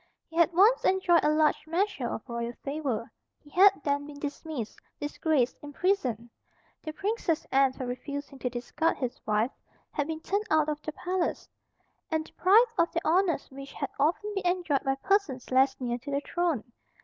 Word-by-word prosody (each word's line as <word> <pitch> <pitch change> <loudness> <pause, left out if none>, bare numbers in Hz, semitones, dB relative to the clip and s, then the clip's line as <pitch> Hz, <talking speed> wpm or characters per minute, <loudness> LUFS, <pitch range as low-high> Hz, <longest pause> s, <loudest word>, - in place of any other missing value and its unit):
He 325 - -15
had 335 0 +4
once 405 +8 +5
enjoyed 370 -3 +4
a 300 - +4
large 305 0 +2
measure 330 - 0
of 220 - -6
royal 235 -1 -3
favour. 275 -6 -3 0.3
He 290 - -20
had 385 +5 +8
then 285 0 0
been 295 -1 -10
dismissed, 285 -4 -5 0.2
disgraced, 290 -3 0
imprisoned. 290 - -1 0.5
The 310 - -5
Princess 390 -2 -1
Anne, 270 -1 +4
for 260 - -5
refusing 280 +2 -6
to 250 - -1
discard 250 +7 -1
his 255 +1 -4
wife, 215 +4 +2 0.4
had 290 - -1
been 320 0 -4
turned 405 +5 -1
out 310 -1 +3
of 300 0 -3
the 310 - -4
palace, 360 +3 -2 0.6
and 315 -1 -1
deprived 440 +9 +4
of 335 0 +3
the 335 - -2
honours 340 -2 +2
which 275 +1 -9
had 280 - -4
often 350 +8 +1
been 390 -3 -1
enjoyed 350 -6 +1
by 270 -1 +1
persons 280 - 0
less 265 +1 +3
near 240 -1 -2
to 270 +4 -9
the 280 0 0
throne. 335 -8 -1
300 Hz, 175 wpm, -28 LUFS, 265-350 Hz, 0.6 s, had